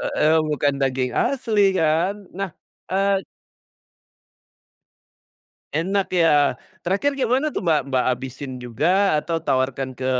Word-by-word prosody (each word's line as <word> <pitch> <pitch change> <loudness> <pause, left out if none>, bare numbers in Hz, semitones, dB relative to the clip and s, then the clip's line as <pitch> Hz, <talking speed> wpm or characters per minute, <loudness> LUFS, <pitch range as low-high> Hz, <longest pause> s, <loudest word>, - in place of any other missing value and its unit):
Heeh, 155 +1 +3
bukan 145 -1 +1
daging 130 -1 0
asli 235 -5 +1 0.2
kan, 165 +5 +2 0.2
nah, 195 -3 -3 0.4
eee 195 0 +1 2.5
Enak 190 +4 -1
ya, 160 -5 +4 0.3
terakhir 275 +10 0
kayak 250 -3 0
mana 270 +4 +2
tuh 185 - -4
Mbak 150 -4 +1
Mbak, 130 -2 +1
habisin 130 +2 -7
juga 155 - +2
atau 165 +2 -2
tawarkan 130 -2 -1
ke, 130 - -4
160 Hz, 120 wpm, -22 LUFS, 135-195 Hz, 2.5 s, ya